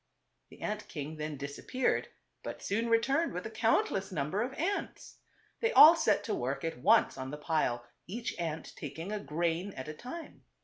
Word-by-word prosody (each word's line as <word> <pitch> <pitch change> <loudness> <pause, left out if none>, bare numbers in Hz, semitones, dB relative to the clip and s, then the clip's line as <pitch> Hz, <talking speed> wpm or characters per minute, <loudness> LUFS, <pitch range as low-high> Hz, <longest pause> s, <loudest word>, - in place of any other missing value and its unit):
The - - -15
ant 210 0 -3
king 155 0 -6
then 150 -1 -4
disappeared, 140 - -1 0.3
but - - -7
soon 225 +3 0
re 230 - +6
turned 275 +8 +1
with 180 - -4
a 220 - -5
countless 220 -3 +1
number 155 +5 -1
of 250 +3 -1
ants. 390 +5 -3 0.4
They 455 0 +1
all 320 -4 +11
set 220 -11 +2
to - - -2
work 135 +3 -2
at 165 -6 -3
once 125 - +4
on 130 0 -4
the 150 - -5
pile, 150 -6 0 0.2
each 230 +6 -4
ant 160 -2 -4
tak - - -7
ing 170 +5 -5
a 210 - -2
grain 170 +5 -1
at 130 - -6
a 155 - -5
time. 255 - -9
180 Hz, 190 wpm, -32 LUFS, 150-230 Hz, 0.4 s, all